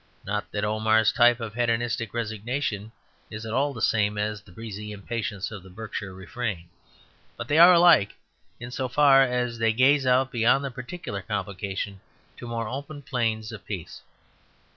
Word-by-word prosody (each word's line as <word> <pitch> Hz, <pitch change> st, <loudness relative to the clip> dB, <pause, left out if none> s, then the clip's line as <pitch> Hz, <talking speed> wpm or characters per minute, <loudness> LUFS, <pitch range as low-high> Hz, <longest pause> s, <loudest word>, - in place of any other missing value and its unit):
Not 105 Hz, +1 st, -3 dB
that 105 Hz, 0 st, -1 dB
Omar's 110 Hz, 0 st, +3 dB
type 120 Hz, 0 st, +4 dB
of 115 Hz, -2 st, -6 dB
hedonistic 115 Hz, -2 st, -1 dB
resignation 110 Hz, -1 st, -3 dB, 0.4 s
is 110 Hz, +1 st, -7 dB
at 110 Hz, -, -5 dB
all 140 Hz, +3 st, +1 dB
the 115 Hz, -5 st, -6 dB
same 105 Hz, -1 st, +2 dB
as 105 Hz, 0 st, -2 dB
the 100 Hz, -, -19 dB
breezy 105 Hz, +1 st, -7 dB
impatience 105 Hz, 0 st, -4 dB
of 105 Hz, -3 st, -7 dB
the 95 Hz, -, -15 dB
Berkshire 100 Hz, 0 st, -6 dB
refrain; 95 Hz, -2 st, -5 dB, 0.7 s
but -, -, -6 dB
they 150 Hz, +2 st, +3 dB
are 175 Hz, +2 st, +10 dB
alike 170 Hz, -, +5 dB, 0.4 s
in 120 Hz, 0 st, -8 dB
so 130 Hz, +1 st, -2 dB
far 140 Hz, 0 st, +6 dB
as 125 Hz, -2 st, 0 dB
they 115 Hz, -1 st, +2 dB
gaze 135 Hz, +3 st, +4 dB
out 130 Hz, +1 st, +3 dB
beyond 120 Hz, +4 st, +2 dB
the 135 Hz, -, -4 dB
particular 125 Hz, -, -6 dB
complication 100 Hz, 0 st, -4 dB, 0.4 s
to 120 Hz, -, -8 dB
more 115 Hz, -1 st, -3 dB
open 140 Hz, +4 st, -7 dB
plains 115 Hz, -4 st, -2 dB
of 110 Hz, -3 st, -9 dB
peace. 95 Hz, -6 st, -7 dB
115 Hz, 165 wpm, -26 LUFS, 105-125 Hz, 0.7 s, are